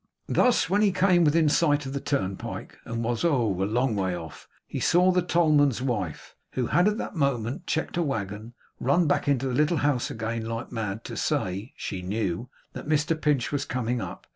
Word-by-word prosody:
Thus 250 -1 +3
when 200 +4 +2
he 205 -2 +4
came 185 -1 +4
within 160 +1 +4
sight 145 -1 +2
of 135 - -5
the 140 - -2
turnpike, 100 -10 -3
and 115 0 -3
was 120 +4 -1
oh 120 - +1
a - - +2
long 120 +3 +1
way 95 -3 -1
off! 80 -3 -10 0.2
he - - -5
saw 180 +2 +4
the 180 0 +2
tollman's 155 -7 +3
wife, 105 - -3 0.2
who 125 - 0
had 175 - +3
that 210 0 -1
moment 140 - -1
checked 160 +1 -1
a - - +2
waggon, 110 - -4 0.2
run 155 +7 +3
back 145 - +1
into 135 -2 +2
the 130 - -2
little 150 +5 +2
house 140 -4 +1
again 115 0 -3
like 115 +2 -5
mad, 110 -2 -3
to - - -7
say 95 +6 -2
(she 95 - -4
knew) 100 +2 -2 0.2
that - - -7
Mr 150 +1 +2
Pinch 145 -5 +1
was 145 -1 -1
coming 125 -2 -2
up. - - -7
130 Hz, 195 wpm, -26 LUFS, 110-155 Hz, 0.2 s, he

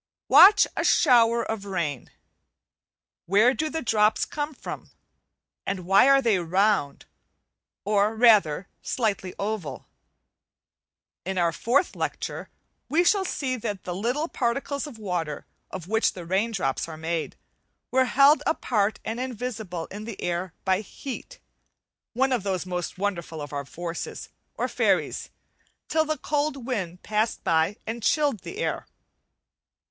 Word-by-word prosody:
Watch 410 +2 +8
a - - -1
shower 235 -1 +4
of 220 -3 -4
rain. 165 -9 -3 1.2
Where 210 +7 +5
do 310 +3 -2
the 320 0 -3
drops 215 -2 +2
come 295 0 -4
from? - - -8 0.7
and 190 -2 -3
why 195 +8 +6
are 275 0 +5
they 220 -5 +3
round, 180 -3 +1 0.8
or 210 +1 +2
rather 205 -7 +4
slightly 200 -6 -2
oval? 200 -6 -4 1.4
In 190 +1 -4
our 170 -2 +2
fourth 245 - +1
lecture - - -4 0.4
we 330 +4 +3
shall 390 +2 +3
se 265 -8 -2
that 205 -4 -4
the 180 - -4
little 245 - -1
particles 275 +2 -2
of 265 -6 -10
water 175 -8 -3 0.2
of 180 -3 -7
which 220 +2 +2
the 175 -2 -8
raindrops 190 -7 -1
are 160 -1 -8
made, 160 +1 -3 0.6
were 260 0 +4
held 275 +4 +5
apart 215 -9 0
and 225 +2 -3
invisible 225 -9 -4
in 210 +2 -7
the 230 -3 -7
air 175 +1 -2
by 190 -1 +2
heat, 275 - -8 0.8
one 265 +3 +1
of 250 -4 +1
the 190 -2 -2
most 180 -1 -4
wonderful 175 -5 -3
of 145 0 -7
our 140 -1 -3
forces* 170 +3 -6 0.3
or - - -1
fairies, - - 0 0.6
till 315 0 +2
the 310 0 -1
cold 290 -2 -2
wind 185 -9 -4
passed 215 +2 -1
by 165 +5 +1
and 230 +1 -4
chilled 285 -1 +2
the 390 - -9
air. 470 - -2
215 Hz, 140 wpm, -25 LUFS, 180-255 Hz, 1.4 s, Watch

